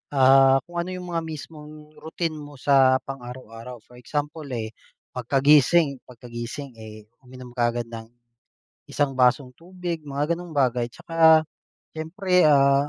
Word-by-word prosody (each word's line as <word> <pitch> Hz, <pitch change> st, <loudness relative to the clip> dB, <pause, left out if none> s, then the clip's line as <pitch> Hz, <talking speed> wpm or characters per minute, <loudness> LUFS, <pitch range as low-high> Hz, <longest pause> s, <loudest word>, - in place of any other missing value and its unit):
ah, 135 Hz, 0 st, +6 dB
kung 175 Hz, 0 st, -6 dB
ano 170 Hz, +1 st, -3 dB
yung 180 Hz, -1 st, -7 dB
mga 165 Hz, -, -1 dB
mismong 150 Hz, 0 st, -10 dB
routine 160 Hz, -1 st, -4 dB
mo 145 Hz, 0 st, -11 dB
sa 130 Hz, -1 st, +3 dB
pang-araw-araw. 125 Hz, -3 st, -9 dB
For 125 Hz, +1 st, -17 dB
example, 150 Hz, +4 st, -4 dB
eh, 110 Hz, -2 st, -4 dB, 0.4 s
pagkagising 140 Hz, +3 st, +3 dB
pagkagising, 120 Hz, +3 st, -8 dB
eh, 110 Hz, -1 st, -11 dB, 0.2 s
uminom 125 Hz, -1 st, -13 dB
ka 120 Hz, -1 st, +1 dB
agad 120 Hz, 0 st, -3 dB
ng 115 Hz, -1 st, -8 dB, 0.8 s
isang 145 Hz, -2 st, -1 dB
basong 125 Hz, +1 st, +2 dB
tubig, 175 Hz, -1 st, -6 dB
mga 145 Hz, +3 st, -2 dB
gano'ng 175 Hz, -1 st, -9 dB
bagay. 125 Hz, -3 st, +1 dB
Tsaka 160 Hz, -1 st, +4 dB, 0.5 s
siyempre, 180 Hz, +3 st, +1 dB
ah, 140 Hz, 0 st, +4 dB
140 Hz, 135 wpm, -24 LUFS, 125-160 Hz, 0.8 s, ah